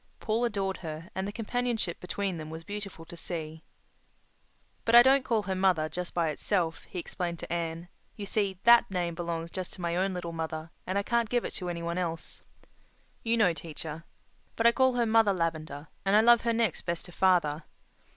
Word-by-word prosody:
Paul 225 +2 0
adored 195 -4 -1
her, 160 0 -7
and 190 +1 -2
the - - -3
companionship 230 -4 -2
between 185 0 -3
them 155 -1 -7
was 160 +1 -7
beautiful 205 -4 -7
to 170 - -10
see. 160 -2 -5 1.2
"But 230 - +3
I 240 - +11
don't 270 +1 +5
call 230 -5 +1
her 190 - -2
'mother' 185 -5 +2
just 180 +1 -5
by 170 -2 +2
itself," 165 +2 -1
he - - -9
explained 175 0 -3
to 165 - -5
Anne. 165 0 -3 0.3
"You 205 - -6
see, 200 -2 0
that 235 0 +7
name 175 -3 -1
belongs 170 -1 -4
just 185 -2 -5
to 185 - -10
my 170 0 -1
own 190 +1 0
little 175 -1 -4
mother, 160 0 -4 0.2
and 185 +2 0
I 200 - +1
can't 235 0 +1
give 245 0 +1
it - - -3
to 180 -2 -4
any 170 -1 -4
one 170 +1 -2
else. 165 -2 -4 0.8
You 230 0 +1
know, 195 -6 +4
teacher. 160 0 -7 0.5
But 230 - 0
I 235 - +9
call 260 +1 +3
her 240 -1 +2
'Mother 220 -2 +4
Lavendar' 155 -3 -3
and 195 +1 +3
I 215 - +7
love 235 +1 +6
her 235 - +1
next 225 -6 +1
best 170 -1 -3
to 180 - -9
father. 170 -5 +2
180 Hz, 205 wpm, -29 LUFS, 165-215 Hz, 1.2 s, I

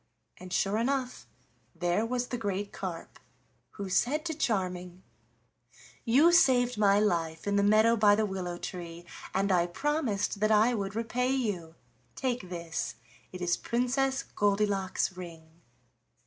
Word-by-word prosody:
And 185 0 -11
sure 200 +4 +1
enough 255 +1 -2 0.5
there 175 +6 0
was 245 0 -2
the 245 - -2
great 200 -1 -3
carp, 180 -4 -7 0.5
who 200 -2 -6
said 280 - +1
to 325 - -1
Charming: 185 - -2 1.0
"You 275 +9 +5
saved 250 -7 +4
my 205 -1 +4
life 165 -6 0
in 200 0 0
the 200 - +3
meadow 215 +3 +5
by 205 -2 +5
the 215 +1 +1
willow 185 -3 -4
tree, 170 -1 -7 0.3
and 195 +1 0
I 175 -2 +3
promised 230 - -1
that 215 +1 +2
I 220 +3 +4
would 200 -3 -3
repay 235 +3 -1
you. 205 -11 -2 0.4
Take 245 -8 -2
this, 170 -2 -4 0.4
it 185 - -8
is 175 -1 +2
Princess 265 +3 0
Goldilock's 200 -2 0
ring." 165 -2 -11
205 Hz, 140 wpm, -29 LUFS, 180-245 Hz, 1.0 s, You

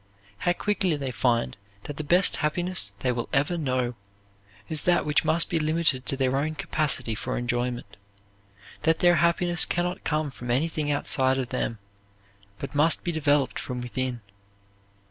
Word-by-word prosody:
How 175 - +1
quickly 195 -4 0
they 140 -3 -4
find 115 - 0 0.3
that 145 - -7
the 155 - -3
best 175 +6 +4
happiness 170 - 0
they 125 - +1
will 120 -1 -3
ever 145 +5 +1
know 130 -6 -1 0.7
is 155 -2 -3
that 175 -1 +3
which 150 -1 +2
must 160 +1 +2
be 165 - 0
limited 155 -4 +1
to 135 - 0
their 130 -1 +1
own 155 +3 -1
capacity 140 -7 +1
for - - -4
enjoyment, 120 0 -3 0.8
that 160 0 +2
their 175 -1 +4
happiness 170 +2 +2
can 175 0 0
not 180 +1 -4
come 155 -2 -1
from 120 -2 -9
anything 150 +4 0
outside 135 -2 +1
of 130 -2 -3
them 115 - -2 0.8
but 140 - -7
must 150 +3 +3
be 175 - -1
developed 145 -4 +1
from 125 -1 -5
within. 125 0 -3
145 Hz, 165 wpm, -26 LUFS, 130-165 Hz, 0.8 s, best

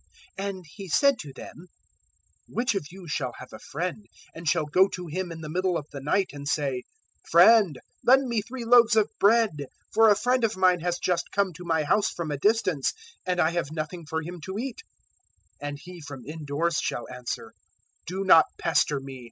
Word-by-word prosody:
'" - - -27
011:005 200 - -2
And 190 -2 -8
He 190 +5 -10
said 280 - +3
to 145 - -8
them, 165 +6 -11 0.8
"Which 245 +1 0
of 195 -8 -3
you 185 0 -12
shall 130 -5 -2
have 125 - -11
a - - -9
friend 180 +6 -5 0.3
and 165 -1 -3
shall 160 -2 +1
go 185 +6 +4
to 180 -2 -7
him 175 +2 -4
in 165 -1 -8
the 155 - -6
middle 180 +2 0
of 145 - -6
the 140 - -7
night 185 +7 0
and 145 0 -7
say, 135 -3 -1 0.5
"`Friend, 215 -9 +7 0.3
lend 265 +1 +5
me 235 -3 0
three 240 +2 -7
loaves 235 -1 +6
of 215 -1 +3
bread; 225 +2 +5
011:006 140 - -4 0.3
for 225 0 +6
a 205 - +6
friend 245 +4 +1
of 220 -3 +1
mine 185 -1 +4
has 175 +1 -1
just 175 -1 -1
come 200 -2 0
to 180 +3 -10
my 160 -2 +1
house 205 +8 +2
from 165 -3 -5
a 145 - -2
distance, 190 - +1 0.3
and 180 -1 0
I 160 -1 +3
have 170 -4 -2
nothing 155 +1 -5
for 160 0 -2
him 175 +1 -8
to 190 +1 -5
eat'? 250 +1 -5 0.8
011:007 145 - -4
"And 145 0 -7
he 180 -1 -10
from 145 -4 -9
indoors 155 +2 -2
shall 120 - -3
answer, 125 -1 -6 0.6
"`Do 190 +2 -3
not 165 -4 +8
pester 150 -3 +1
me. 135 -1 -9
175 Hz, 210 wpm, -26 LUFS, 150-200 Hz, 0.8 s, not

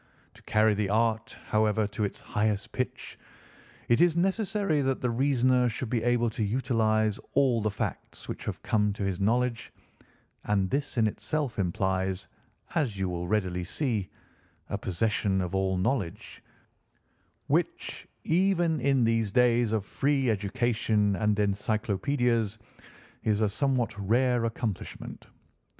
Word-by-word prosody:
To - - -18
carry 110 0 +3
the 105 -1 -1
art, 110 +1 0
however, 110 0 +2
to 105 +1 -3
its 100 - -5
highest 105 -1 -1
pitch, - - -4 0.7
it 120 - +3
is 175 -2 +4
necessary 195 -3 +1
that 135 -1 0
the 125 - 0
reasoner 130 -1 +3
should 115 +1 -5
be 120 -3 +1
able 120 0 +2
to 110 - -2
utilise 110 -2 +1
all 130 -5 +3
the 110 - +1
facts 100 - -5
which - - -6
have - - -5
come 105 -2 +1
to 100 - -5
his 95 -1 -1
knowledge; 115 +3 0 0.7
and 100 -2 +1
this 140 -1 -2
in 115 - +4
itself 135 +3 -2
implies, 95 0 -1 0.5
as 125 -10 0
you 95 -1 -1
will 90 0 -3
readily 90 -3 0
see, 110 - -2 0.6
a - - 0
possession 95 +1 0
of 90 -1 -3
all 95 -1 +1
knowledge, 95 -3 -2 1.0
which, - - -1 0.2
even 175 -2 +2
in 135 -1 +3
these 115 -2 +2
days 120 0 +3
of 110 -3 0
free 135 -1 +1
education 110 -1 +1
and 105 -1 +2
encyclopædias, 110 +3 0 0.7
is 105 -2 +1
a 110 - +4
somewhat 130 +2 0
rare 120 +4 +2
accomplishment. 115 -3 -5
110 Hz, 135 wpm, -28 LUFS, 100-125 Hz, 1.0 s, is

